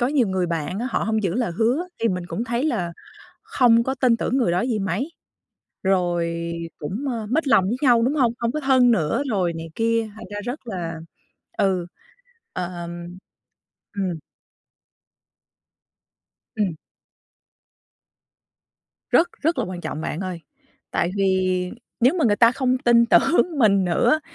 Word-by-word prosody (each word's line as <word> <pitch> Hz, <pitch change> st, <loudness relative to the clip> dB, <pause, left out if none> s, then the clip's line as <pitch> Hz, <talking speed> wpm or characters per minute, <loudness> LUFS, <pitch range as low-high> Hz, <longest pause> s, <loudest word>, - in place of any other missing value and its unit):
có 245 Hz, -, +3 dB
nhiều 265 Hz, -6 st, +2 dB
người 190 Hz, -1 st, 0 dB
bạn 170 Hz, +2 st, -3 dB
á, 240 Hz, -, -2 dB
họ -, -, +1 dB
hông 220 Hz, 0 st, 0 dB
giữ 185 Hz, -4 st, 0 dB
lời 235 Hz, -6 st, -1 dB
hứa 255 Hz, +11 st, +1 dB
thì 230 Hz, -, +2 dB
mình 180 Hz, -3 st, -3 dB
cũng 220 Hz, +6 st, -3 dB
thấy 240 Hz, +3 st, -1 dB
là 190 Hz, -, -1 dB, 0.5 s
không 235 Hz, -2 st, +4 dB
có 265 Hz, +2 st, -2 dB
tin 250 Hz, -3 st, +3 dB
tưởng 255 Hz, +3 st, 0 dB
người 235 Hz, -9 st, +2 dB
đó 175 Hz, +2 st, +1 dB
gì 235 Hz, -3 st, -1 dB
mấy, 195 Hz, -, -2 dB, 0.7 s
rồi 175 Hz, -3 st, +1 dB, 0.4 s
cũng, 190 Hz, -, -5 dB
ờ, 225 Hz, -3 st, -4 dB
mích 305 Hz, +5 st, 0 dB
lòng 220 Hz, -7 st, +5 dB
với 210 Hz, +6 st, 0 dB
nhau, 245 Hz, -4 st, +5 dB
đúng 265 Hz, +5 st, +1 dB
hông? 250 Hz, -6 st, +2 dB
Hông 235 Hz, -1 st, 0 dB
có 305 Hz, -, -2 dB
thân 260 Hz, -3 st, +4 dB
nữa 180 Hz, -, +1 dB
rồi 180 Hz, -4 st, 0 dB
này 165 Hz, 0 st, -6 dB
kia, 230 Hz, -1 st, +1 dB
thành 220 Hz, -, -10 dB
ra 205 Hz, -, -4 dB
rất 250 Hz, +1 st, -6 dB
là 170 Hz, -6 st, -4 dB, 0.6 s
ừ, 185 Hz, -3 st, +1 dB, 0.7 s
ờm, 175 Hz, -1 st, -5 dB, 0.9 s
ừm. 185 Hz, -5 st, -2 dB, 2.4 s
Ừm. 205 Hz, -6 st, 0 dB, 2.4 s
Rất 345 Hz, -, +4 dB
rất 325 Hz, +2 st, +1 dB
là -, -, +1 dB
quan 180 Hz, -1 st, -6 dB
trọng 155 Hz, -, -5 dB
bạn 160 Hz, -, -4 dB
ơi, 185 Hz, -3 st, -4 dB, 0.5 s
tại 175 Hz, -, 0 dB
vì 185 Hz, -2 st, +1 dB, 0.3 s
nếu 255 Hz, +7 st, +4 dB
mà -, -, +2 dB
người 210 Hz, -3 st, +3 dB
ta 230 Hz, +1 st, +6 dB
không 255 Hz, -1 st, +1 dB
tin 235 Hz, -2 st, +4 dB
tưởng 335 Hz, +4 st, +3 dB
mình 200 Hz, -6 st, +4 dB
nữa 180 Hz, -, +2 dB
220 Hz, 160 wpm, -23 LUFS, 180-245 Hz, 2.4 s, ta